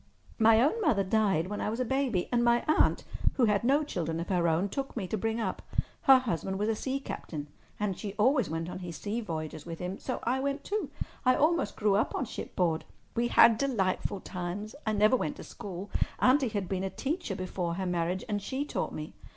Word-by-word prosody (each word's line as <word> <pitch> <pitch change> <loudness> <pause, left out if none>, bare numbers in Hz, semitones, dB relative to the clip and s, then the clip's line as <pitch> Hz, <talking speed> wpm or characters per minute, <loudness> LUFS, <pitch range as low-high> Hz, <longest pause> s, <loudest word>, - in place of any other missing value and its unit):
My 225 0 +6
own 305 - +2
mother 240 - +3
died 195 -4 +2
when 205 +2 -4
I - - 0
was 225 +3 -3
a 255 - +1
baby, 260 -7 0
and 240 -1 +3
my 235 0 +4
aunt, 310 - +3 0.3
who 250 - +3
had 210 -1 +2
no 280 +5 +3
children 165 - -3
of 170 - -4
her 175 -3 +2
own, 165 +4 +2
took 270 +5 -4
me 205 - -1
to 185 - -2
bring 225 +2 -1
up. 225 - -2 0.5
Her 265 - +11
husband 190 -6 -2
was 210 +2 0
a 225 - +1
sea 265 +5 -2
captain, 150 - -6 0.3
and 205 -2 0
she 200 0 -5
always 240 - +3
went 165 +1 -3
on 180 - -6
his 175 -4 -6
sea 215 +3 -3
voyages 155 -6 -5
with 165 -1 -5
him. 180 +3 -4
So 255 - -3
I 250 +3 +1
went 280 +1 -2
too. 405 -8 -2 0.3
I 255 -1 +5
almost 310 -9 +2
grew 210 -2 +3
up 205 - +1
on 270 - -1
shipboard. 170 -7 -1 0.3
We 235 +1 +1
had 230 -1 +6
delightful 200 -6 0
times. 185 +4 -5
I 215 - +2
never 215 +4 +5
went 285 +3 -1
to - - -9
school. 195 0 -7 0.3
Auntie 265 +1 +4
had 205 -4 -2
been 190 0 -2
a 195 - -1
teacher 275 - -3
before 180 -2 -3
her 190 +1 -2
marriage, 175 +1 -1
and 205 -1 -1
she 265 +7 -2
taught - - -3
me. 155 0 -6
210 Hz, 220 wpm, -30 LUFS, 180-255 Hz, 0.5 s, Her